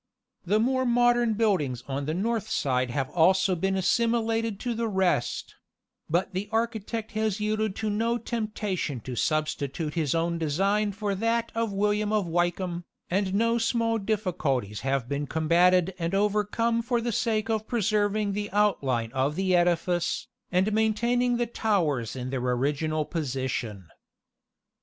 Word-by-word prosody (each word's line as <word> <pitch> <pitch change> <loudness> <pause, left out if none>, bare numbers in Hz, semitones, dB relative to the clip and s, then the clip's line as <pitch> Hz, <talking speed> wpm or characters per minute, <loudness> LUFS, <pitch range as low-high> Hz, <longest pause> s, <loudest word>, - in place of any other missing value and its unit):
The 210 +4 +3
more 260 +3 +2
modern 240 -2 +3
buildings 160 - 0
on 140 +1 -3
the 155 - -1
north 220 +3 -1
side 130 - 0
have 130 +2 -2
also 185 +3 +4
been 195 +3 0
assimilated 225 +1 +1
to 245 -1 -1
the 230 0 -1
rest; 190 - 0 0.6
but 175 +4 0
the 195 +3 -3
architect 225 -1 -2
has 215 -2 -1
yielded 215 -1 -1
to 220 -1 -2
no 230 +3 +1
temptation 210 - -3
to 125 +1 -6
substitute 155 +1 -1
his 160 -3 0
own 170 0 0
design 195 +7 +1
for 205 0 -2
that 230 +3 0
of 230 -1 -1
William 210 +1 +1
of 210 -3 +1
Wykeham, 175 +1 -1 0.3
and 190 +1 0
no 230 +2 +2
small 230 0 +1
difficulties 165 - -1
have 135 -1 -1
been 145 +2 -2
combated 175 +4 +3
and 170 +3 -1
overcome 210 +3 +1
for 240 +1 0
the 235 +1 -2
sake 220 -1 0
of 220 -1 -1
preserving 210 -2 +1
the 205 +1 -3
outline 135 - +1
of 135 +4 0
the 185 0 +2
edifice, 175 0 +1 0.2
and 190 +4 +2
maintaining 235 +3 +2
the 240 - +1
towers 170 - 0
in 130 0 -5
their 135 - -1
original 145 +5 0
position." 130 - -3
195 Hz, 145 wpm, -27 LUFS, 155-220 Hz, 0.6 s, also